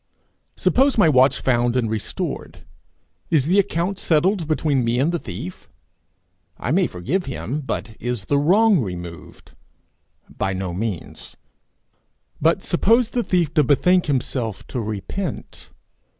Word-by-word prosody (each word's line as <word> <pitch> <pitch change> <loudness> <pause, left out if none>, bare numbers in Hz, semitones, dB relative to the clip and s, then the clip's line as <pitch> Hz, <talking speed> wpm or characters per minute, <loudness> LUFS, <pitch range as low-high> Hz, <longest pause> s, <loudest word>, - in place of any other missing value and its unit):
Suppose 270 +1 +2
my 205 - +5
watch 130 -2 +4
found 120 -1 +1
and 125 -3 +1
restored, 110 -1 -5 0.6
is 150 -5 +3
the 185 +6 +3
account 190 0 -1
settled 170 +2 +1
between 150 -4 +1
me 115 +1 0
and 140 +6 +2
the 170 - -1
thief? 150 - -8 0.9
I - - -3
may - - +3
forgive 165 - -2
him, 135 +2 -4
but 110 -4 -4
is 120 -4 -3
the 140 +4 +2
wrong 200 +6 +4
removed? 85 - -7 0.8
By 95 - -3
no 95 -1 -3
means. 100 -1 -5 1.0
But 165 +5 +2
suppose 225 +6 +2
the 245 - 0
thief 175 -8 0
to 150 - +4
bethink 180 +7 +3
himself, 115 -6 -2
to 125 - -3
repent. 110 - -5
140 Hz, 135 wpm, -22 LUFS, 115-180 Hz, 1.0 s, my